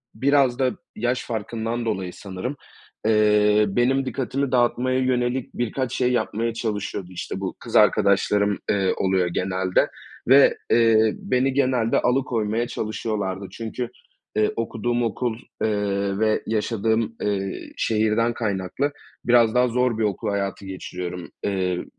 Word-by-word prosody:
biraz 135 +1 +3
da 130 -1 +2 0.2
yaş 120 +3 -1
farkından 115 +1 -3
dolayı, 95 -5 -2
sanırım, 100 +8 -5 0.5
eee, 105 -1 +4
benim 125 +6 +1
dikkatimi 130 +2 -2
dağıtmaya 130 +1 +2
yönelik 125 0 0
birkaç 120 +1 -2
şey 125 -1 +1
yapmaya 115 -1 -1
çalışıyordu. 105 -5 -3
İşte, 90 +1 -5
bu 95 -1 -4
kız - - -7
arkadaşlarım, 100 +1 +3
eee, 95 -2 +2
oluyor 95 -2 +1
genelde 95 +1 0 0.4
ve, 135 +3 +6
eee, 110 -2 +4
beni 130 +1 0
genelde 130 -4 +2
alıkoymaya 120 -3 0
çalışıyorlardı. 105 -4 -3
Çünkü, 115 +1 -5 0.5
eee, 110 0 +2
okuduğum 120 +1 -1
okul, 115 +1 -1 0.3
eee, 100 -2 0
ve 110 0 +2
yaşadığım, 110 +1 0
eee, 100 -2 -3
şehirden 110 +1 +1
kaynaklı 110 +5 -2 0.3
biraz 120 -2 +4
daha 125 0 +4
zor 125 -1 +1
bir 110 - 0
okul 105 +1 -1
hayatı 100 0 -2
geçiriyorum. 90 -2 -6
Iıı, 95 -3 -1
110 Hz, 125 wpm, -23 LUFS, 100-120 Hz, 0.5 s, ve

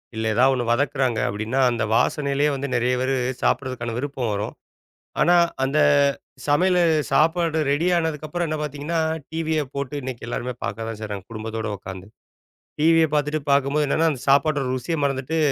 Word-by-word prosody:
இல்ல 110 0 -2
எதாவது 130 +2 +4
1 125 -2 -1
வதக்குறாங்க 130 -2 +1
அப்படின்னா, 110 +6 -2
அந்த 115 -2 -1
வாசனையிலேயே 145 +3 +1
வந்து 140 +1 -3
நிறைய 125 +1 +1
பேரு 135 +1 +1 0.3
சாப்பிடுறதுக்கான 125 -3 -1
விருப்பம் 130 -3 -2
வரும். 105 +1 -3 0.7
ஆனா 175 +1 +5 0.3
அந்த 135 +3 0 0.7
சமையலு 180 +5 +3 0.3
சாப்பாடு 165 0 +2
ரெடி 145 +5 +1
ஆனதுக்கு 160 -3 -1
அப்புறம் 175 +2 -2
என்ன 155 0 -2
பார்த்தீங்கன்னா 150 +3 -3 0.3
டிவிய 160 -1 0
போட்டு 140 +1 -4
இன்னைக்கு 125 -3 -6
எல்லாருமே 125 +1 -3
பார்க்கதான் 110 +2 -4
செய்றாங்க, 105 -3 -6
குடும்பத்தோட 110 0 -5
உக்காந்து. 95 0 -9 0.7
டிவிய 165 +1 +5
பார்த்துட்டு 150 +1 0
பார்க்கும்போது 140 +2 +2
என்னன்னா 160 +4 +2
அந்தச் 130 -1 -5
சாப்பாட்டோட 140 0 +3
ருசியை 130 +6 -2
மறந்துட்டு, 140 +3 -1
140 Hz, 145 wpm, -23 LUFS, 120-155 Hz, 0.7 s, ஆனா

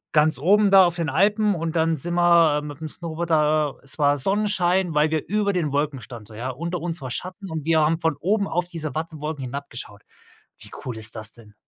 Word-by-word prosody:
ganz 150 -3 +4
oben 200 +7 +4
da 195 -1 +8
auf 175 -1 0
den 165 -3 -1
Alpen 205 +6 +2
und 165 0 -3
dann 165 0 +2
sind 170 +5 -2
wir 170 -4 +4
mit 145 -1 -8
'nem 160 - -4
Snowboard 170 +1 -5
da 150 -2 +2
es 135 - -6
war 145 0 +4
Sonnenschein, 190 0 +1
weil 150 +1 +3
wir 155 -2 -1
über 205 0 +1
den 160 -6 -1
Wolken 145 -2 -1
standen, 110 0 -10
so, 110 - -12
ja. 125 +4 -4
Unter 170 +6 -4
uns 165 -3 -4
war 130 - -5
Schatten 185 +4 -5
und 155 -2 -4
wir 160 -1 +3
haben 160 +2 +2
von 160 -3 0
oben 200 +5 +1
auf 175 +1 -1
diese 155 -6 -5
Wattenwolken 155 -3 -4
hinabgeschaut. 125 -6 -7 0.6
Wie - - -13 0.2
cool 125 -3 -4
ist 110 +1 -6
das 110 -1 -3
denn? 110 -3 -16
160 Hz, 220 wpm, -23 LUFS, 145-175 Hz, 0.6 s, da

